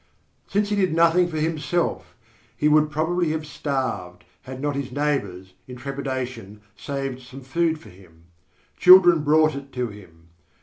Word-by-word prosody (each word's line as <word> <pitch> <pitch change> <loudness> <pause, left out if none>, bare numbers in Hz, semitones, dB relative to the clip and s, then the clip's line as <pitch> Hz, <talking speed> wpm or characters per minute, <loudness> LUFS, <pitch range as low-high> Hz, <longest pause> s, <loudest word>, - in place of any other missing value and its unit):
Since 205 +1 0
he 210 - 0
did 185 -5 +1
nothing 170 +2 +4
for 160 -2 -5
himself, 165 +2 -2 0.4
he 150 - +1
would 150 0 +4
probably 165 +3 -1
have 160 -1 -4
starved 130 -13 -4 0.2
had 130 0 -9
not 145 0 -2
his 140 -2 -4
neighbours, 100 -11 -3
in 125 - -9
trepidation, 130 -5 -6
saved 135 -2 -5
some 130 +2 -12
food 160 +5 0
for 115 - -15
him. 90 -3 -19 0.6
Children 180 -3 +8
brought 155 +1 +3
it 140 0 -8
to 125 -2 -2
him. 85 -6 -16
140 Hz, 155 wpm, -23 LUFS, 125-160 Hz, 0.6 s, Children